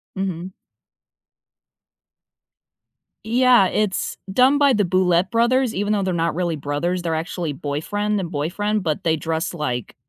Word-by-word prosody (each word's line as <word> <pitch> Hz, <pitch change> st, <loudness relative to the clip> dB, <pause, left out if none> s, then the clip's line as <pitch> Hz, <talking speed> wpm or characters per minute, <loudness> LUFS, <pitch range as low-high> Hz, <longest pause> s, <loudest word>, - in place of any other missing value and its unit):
Mhm. 185 Hz, -1 st, -4 dB, 2.7 s
Yeah, 245 Hz, -2 st, +4 dB
it's 210 Hz, -1 st, -1 dB, 0.2 s
done 260 Hz, +6 st, +4 dB
by 285 Hz, -2 st, +4 dB
the 210 Hz, -, +2 dB
Boulet 185 Hz, 0 st, +2 dB
Brothers, 240 Hz, +1 st, +2 dB
even 205 Hz, +2 st, 0 dB
though 200 Hz, -2 st, 0 dB
they're 185 Hz, -1 st, -1 dB
not 170 Hz, -1 st, 0 dB
really 175 Hz, -2 st, -1 dB
brothers 145 Hz, +6 st, -2 dB
they're 165 Hz, -2 st, -1 dB
actually 165 Hz, -1 st, -3 dB
boyfriend 205 Hz, +10 st, -2 dB
and 180 Hz, -3 st, -4 dB
boyfriend, 190 Hz, +7 st, -2 dB
but 155 Hz, -3 st, -2 dB
they 160 Hz, -1 st, +3 dB
dress 160 Hz, +2 st, -3 dB
like 125 Hz, -8 st, -4 dB
185 Hz, 135 wpm, -21 LUFS, 160-210 Hz, 2.7 s, Yeah